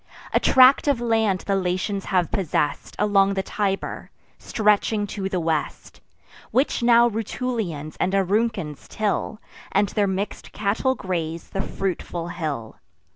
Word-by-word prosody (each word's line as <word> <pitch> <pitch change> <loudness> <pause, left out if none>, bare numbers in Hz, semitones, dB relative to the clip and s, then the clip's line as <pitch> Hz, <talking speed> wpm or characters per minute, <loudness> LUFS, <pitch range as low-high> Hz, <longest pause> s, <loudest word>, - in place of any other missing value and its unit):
A - - +4
tract 260 +3 +6
of 280 -4 +2
land 225 -5 +1
the 200 - -1
Latins 190 +2 -1
have 180 -3 +1
possess'd 155 -7 -1
Along 200 -1 +3
the 190 - -1
Tiber, 195 -1 -3 0.3
stretching 210 0 +1
to 195 -1 -4
the 185 - -1
west, 160 -2 -3 0.5
Which 265 0 +1
now 235 0 +6
Rutulians 220 - -3
and 185 +2 +1
Auruncans 195 -5 0
till, 215 0 -2 0.3
And 200 0 +2
their 205 -1 +1
mix'd 190 +2 -4
cattle 215 +6 0
graze 170 -5 -4
the 195 - -1
fruitful 175 -3 -4
hill. 150 -10 -4
195 Hz, 130 wpm, -23 LUFS, 180-220 Hz, 0.5 s, tract